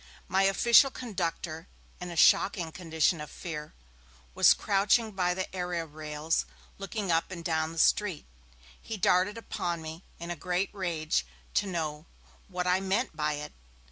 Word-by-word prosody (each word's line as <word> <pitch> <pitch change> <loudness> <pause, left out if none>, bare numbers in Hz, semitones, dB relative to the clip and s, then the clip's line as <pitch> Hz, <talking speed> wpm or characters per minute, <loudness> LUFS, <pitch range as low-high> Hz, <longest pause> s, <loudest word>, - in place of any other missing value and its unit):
My 190 +1 +2
official 235 +7 +6
conductor, 175 -8 -4 0.3
in 180 -1 -6
a 170 - -6
shocking 170 -1 +4
condition 160 -1 0
of 150 - -7
fear, 150 -4 -7 0.6
was - - +6
crouching 210 +3 +2
by 180 -2 0
the 190 0 -4
area 180 -2 -2
rails 155 +1 -2 0.3
looking 195 -1 -3
up 165 0 +1
and 170 -3 -8
down 160 -1 0
the 165 - -10
street. 185 0 +2 0.6
He 220 - -5
darted 190 +1 +2
upon 175 -6 -3
me, 160 +2 -8
in 170 +1 -6
a - - -2
great 180 +4 -2
rage, 165 - -1 0.3
to 205 - +1
know 155 -3 -3 0.4
'what 180 -2 -3
I 180 +1 +3
meant 195 +1 -1
by 150 0 0
it?' 150 0 -6
175 Hz, 155 wpm, -29 LUFS, 160-195 Hz, 0.6 s, official